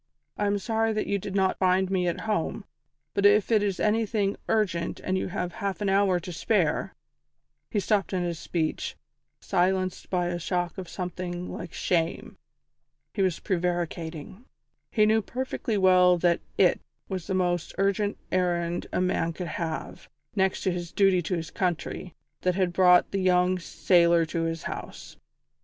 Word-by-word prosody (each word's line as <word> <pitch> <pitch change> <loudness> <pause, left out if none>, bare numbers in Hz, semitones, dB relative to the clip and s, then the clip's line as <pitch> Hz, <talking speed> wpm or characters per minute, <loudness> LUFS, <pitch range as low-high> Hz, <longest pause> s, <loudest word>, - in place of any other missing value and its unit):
I 205 - 0
am 200 0 +1
sorry 225 +1 0
that 215 - -1
you 200 - 0
did 195 +1 -6
not 190 -1 +1
find 185 0 +2
me 180 -2 +1
at 170 - -2
home, 215 -1 -2 0.5
but 200 - 0
if 205 +2 +5
it 215 -2 +5
is 200 -3 -1
anything 210 -2 +1
urgent 185 -7 0
and 185 - -2
you 190 - -1
have 180 0 -3
half 200 -1 -3
an 205 -2 0
hour 195 -2 +3
to 180 +1 -7
spare 170 -3 0 0.4
" - - -53
He 210 - 0
stopped 200 0 +1
in 185 -2 0
his 170 -2 -3
speech, 160 -3 -2 0.5
silenced 185 +1 0
by 180 -2 +1
a 175 0 -2
shock 175 0 -2
of 185 - -7
something 180 -1 -4
like 170 -2 -7
shame. 170 -2 -1 0.7
He 200 - -1
was 185 -3 +2
prevaricating. 175 - -3 0.4
He 215 -2 +3
knew 220 +1 +3
perfectly 245 -2 -3
well 180 -2 +5
that 170 0 +2 0.2
"it" - - +4 0.3
was 185 -3 -5
the 190 - -1
most 175 -2 0
urgent 200 +1 +1
errand 175 -2 0
a - - 0
man 170 -2 0
could 175 0 -5
have, 160 -1 -5 0.3
next 190 -1 +1
to 190 - +2
his 175 -1 -4
duty 195 -3 +3
to 180 +2 -2
his 165 -1 -5
country, 180 0 -3 0.3
that 180 -1 +1
had 185 -2 +1
brought 180 -1 +5
the 195 - -1
young 180 0 +3
sailor 170 -1 +3
to 165 +1 -2
his 165 0 -3
house. - - -7
185 Hz, 170 wpm, -27 LUFS, 175-200 Hz, 0.7 s, if